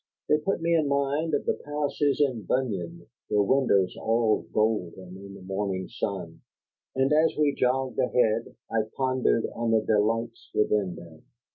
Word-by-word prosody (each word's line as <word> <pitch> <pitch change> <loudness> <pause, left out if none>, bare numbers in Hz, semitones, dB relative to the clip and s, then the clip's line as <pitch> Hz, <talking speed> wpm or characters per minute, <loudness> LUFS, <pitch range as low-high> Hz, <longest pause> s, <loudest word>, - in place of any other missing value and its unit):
They 150 - +3
put 165 +1 -2
me 170 0 +2
in 155 -3 +2
mind 140 +3 0
of - - -2
the - - +2
palaces 145 -1 -1
in 130 -6 +1
Bunyan, 90 -10 -2 0.2
their 105 -1 +3
windows 100 -6 +2
all 110 -6 +1
golden 95 -4 -1
in 100 +1 -10
the 95 - -12
morning 95 0 -3
sun; - - -5 0.5
and 135 +2 +2
as 155 +1 +3
we 150 -2 +3
jogged 130 +1 0
ahead, 115 -2 +1 0.2
I 115 -1 +2 0.2
pondered 130 -3 +1
on 115 0 -2
the 110 -1 +3
delights 115 +2 0
within 105 -4 +1
them. 80 -2 -13
115 Hz, 155 wpm, -27 LUFS, 100-140 Hz, 0.5 s, They